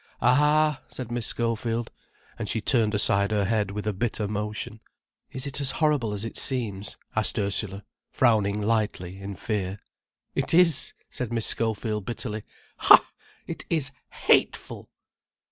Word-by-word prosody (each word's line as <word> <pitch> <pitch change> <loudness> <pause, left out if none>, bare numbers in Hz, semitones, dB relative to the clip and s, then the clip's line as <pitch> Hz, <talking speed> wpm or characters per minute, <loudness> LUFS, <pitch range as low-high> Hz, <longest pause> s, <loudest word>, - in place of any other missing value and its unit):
"Ah!" 150 +2 +3
said 125 -2 -7
Miss 120 -2 -2
Schofield, 115 0 -1 0.5
and 110 -3 -3
she 115 - +1
turned 110 -2 +3
aside 100 -1 +5
her 105 -2 +1
head 105 -1 0
with 105 +1 -5
a 105 - 0
bitter 105 0 -1
motion. 105 +1 -4 0.5
"Is 130 +1 -4
it 140 0 -3
as 135 - 0
horrid 150 -4 +2
as 105 0 -3
it 115 - -6
seems?" 105 -7 -2 0.2
asked 110 +1 +1
Ursula, 100 -1 0 0.3
frowning 105 -4 +2
lightly, 100 -4 -1
in 100 0 -6
fear. 100 -4 -3 0.6
"It - - +1
is," 170 -5 +4 0.2
said 125 -3 -4
Miss 115 -2 +1
Schofield, 110 -2 -1
bitterly. 110 -2 -4 0.4
"Ha!—it - - +3
is 150 -5 0 0.3
_hateful!" - - +2
110 Hz, 140 wpm, -26 LUFS, 105-125 Hz, 0.6 s, aside